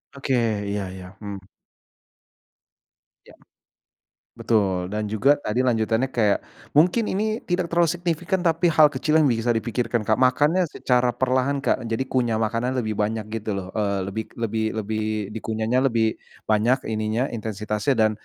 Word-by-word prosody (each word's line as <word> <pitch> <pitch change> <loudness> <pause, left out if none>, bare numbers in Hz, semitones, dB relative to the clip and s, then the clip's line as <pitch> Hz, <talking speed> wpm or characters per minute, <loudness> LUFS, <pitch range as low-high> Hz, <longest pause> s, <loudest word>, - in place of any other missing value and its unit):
Oke 135 -1 -2 0.4
iya 100 0 -2
iya, 90 -1 -9
mhm. 100 -2 -7 1.8
Iya. - - -17 1.0
Betul 95 -5 +1
dan 105 +3 -3
juga 130 +7 +4
tadi 125 -5 -3
lanjutannya 115 0 +1
kayak, 105 -4 +3 0.3
mungkin 180 +9 +3
ini 215 +3 -1
tidak 175 -1 -1
terlalu 170 -1 +2
signifikan 175 +2 -1
tapi 170 0 +2
hal 155 -1 +7
kecil 150 +2 +1
yang 155 - +4
bisa 120 -1 +1
dipikirkan 115 0 -1
Kak 110 - +4
makannya 145 +8 +3
secara 125 -6 +1
perlahan 130 +3 0
Kak 135 -2 0
jadi 115 +2 -1
kunyah 120 -4 0
makanan 115 +4 0
lebih 110 -3 -2
banyak 105 +1 -1
gitu 110 -1 -3
loh, 95 - -7
eee, 100 -2 0
lebih 110 +2 -4
lebih 110 -1 -1 0.2
lebih 110 +1 -3 0.3
di - - -3
kunyahnya 110 +3 0
lebih 110 -1 +1 0.3
banyak 115 +5 +2
ininya 110 +3 -1
intensitasnya 105 +3 -2
dan, 110 -1 +4
115 Hz, 150 wpm, -23 LUFS, 110-140 Hz, 1.8 s, hal